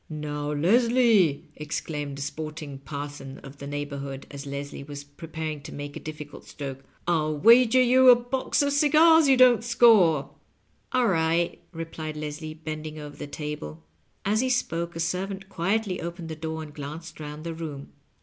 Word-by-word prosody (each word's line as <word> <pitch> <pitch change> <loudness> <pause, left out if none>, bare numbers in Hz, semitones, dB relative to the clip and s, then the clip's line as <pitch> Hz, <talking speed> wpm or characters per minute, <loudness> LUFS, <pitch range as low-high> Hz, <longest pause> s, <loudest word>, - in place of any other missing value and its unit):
"Now, 150 -1 -4
Leslie," 215 - +3
exclaimed 150 -1 -4
a 140 - -3
sporting 155 -2 -6
parson 140 -1 -7
of 135 0 -11
the 140 - -8
neighborhood, 140 -1 -5
as 140 0 -7
LesHe 140 0 -6
was 145 -1 -7
preparing 155 +1 -6
to 145 - -9
make 145 0 -7
a - - -5
diffi 150 -1 -7
cult 145 - -13
stroke, 135 -2 -6 0.3
"I'll 155 -3 +1
wager 235 - +6
yon 255 +1 +6
a 250 - +10
box 245 +4 0
of 285 0 +1
cigars 310 +2 +6
you 265 -1 +5
don't 250 -3 +6
score.". 215 - +5 0.6
"All 255 -1 +2
right," 165 -1 +1
replied 165 -2 -6
Leslie, 155 +1 -5
bending 155 -1 -6
over 150 -1 -8
the - - -6
table. 145 - -6 0.4
As 210 +2 +2
he 260 - 0
spoke 170 -9 -1
a - - -5
servant 190 +3 -3
quietly 195 +2 -1
opened 170 0 -6
the 160 - -4
door 160 0 -5
and 150 -1 -11
glanced 155 +3 -8
round 150 0 -7
the 165 0 -4
room. 155 -4 -7
155 Hz, 170 wpm, -26 LUFS, 145-195 Hz, 0.6 s, a